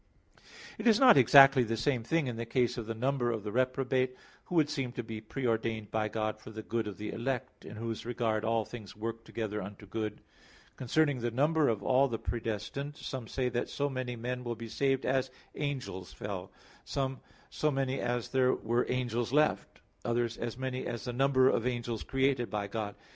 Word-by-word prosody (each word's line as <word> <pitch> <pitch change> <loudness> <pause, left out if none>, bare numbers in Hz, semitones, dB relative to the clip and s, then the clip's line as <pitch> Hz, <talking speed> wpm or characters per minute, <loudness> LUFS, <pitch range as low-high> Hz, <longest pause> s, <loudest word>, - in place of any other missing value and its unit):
It - - 0
is 225 -1 +6
not 260 -2 +8
exactly 135 +1 +8
the 115 -1 0
same 125 +1 +1
thing 160 +7 +1
in 125 -3 -3
the 115 - -3
case 125 0 +1
of 120 -3 -5
the 115 - -3
number 130 +1 +1
of 110 -3 -2
the 105 - -4
reprobate, 130 +1 +1 0.3
who 180 - -5
would 155 -3 +5
seem 135 -4 -2
to 120 - -4
be 110 -1 -6
pre 125 +4 -5
ordained 110 -2 -1
by 110 -1 +1
God 110 0 -2
for 110 - -11
the 110 0 -7
good 115 0 -2
of 100 -3 -6
the 105 - -4
elect, 130 +1 -3
in - - -9
whose 115 0 -4
regard 115 -2 -1
"all 115 0 +1
things 110 -4 -9
work 115 +1 -4
together 110 -2 -3
unto 100 +2 -8
good" 105 +1 -3
(Rom. - - -21 0.6
8:28). - - -38
Concerning 145 +2 +2
the 120 0 -1
number 150 +5 +2
of 105 -3 -1
all 130 +1 +4
the 115 -3 -2
predestined, 115 +7 -4
some 130 -4 -5
say 130 +1 -1
that 120 0 -2
so 145 0 -1
many 130 -2 -3
men 125 +2 -4
will 120 -1 -3
be 115 +1 -8
saved 135 +2 +1
as 130 0 +1 0.2
angels 130 -11 -4
fell; 100 -3 -5 0.3
some, 135 -1 -2 0.3
so 155 - +1
many 135 -1 0
as 120 -1 -1
there 130 -1 +3
were 120 +2 0
angels 120 -2 -1
left; 150 +2 +1 0.2
others, 120 -1 0
as 120 0 -4
many 130 -1 -3
as 120 -1 -4
the 125 - -3
number 130 0 +4
of 120 -2 +2
angels 120 -3 -2
created 135 -2 +1
by 105 -1 -2
God. 105 0 -4
120 Hz, 205 wpm, -31 LUFS, 110-130 Hz, 0.6 s, not